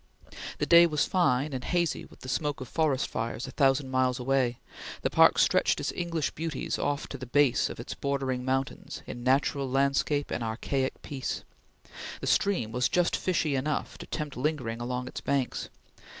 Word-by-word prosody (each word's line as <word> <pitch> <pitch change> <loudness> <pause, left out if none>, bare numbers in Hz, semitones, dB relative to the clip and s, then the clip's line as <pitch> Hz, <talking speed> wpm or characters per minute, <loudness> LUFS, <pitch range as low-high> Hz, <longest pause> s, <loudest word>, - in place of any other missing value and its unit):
The - - 0
day 170 0 +8
was 150 -3 +1
fine, 145 -5 +1
and 130 -1 -3
hazy 175 -2 0
with - - -18
the - - -9
smoke 145 +3 -1
of 130 - -6
forest 150 -2 +1
fires 115 +2 -3
a 130 - -7
thousand 135 -1 +2
miles 130 -1 +2
away; 125 -1 +1 0.5
the - - +1
park - - +6
stretched - - +3
its - - -2
English 170 -4 -2
beauties 160 -3 -3
off 145 0 -1
to 140 - -6
the 130 - -7
base 145 0 +3
of - - -8
its - - -5
bordering 135 -2 -2
mountains 135 +2 -3
in 120 - -7
natural 135 +1 +2
landscape 140 +2 +1
and 120 - -2
archaic 130 +4 -2
peace; 135 -3 -4 0.8
the - - -5
stream 195 - +1
was 125 +2 +1
just 175 -1 +2
fishy 165 -5 0
enough 145 +3 -2
to - - -8
tempt 150 -2 -4
lingering 125 -4 -2
along 125 +1 -3
its - - -6
banks. 140 -3 -1
135 Hz, 180 wpm, -28 LUFS, 125-150 Hz, 0.8 s, day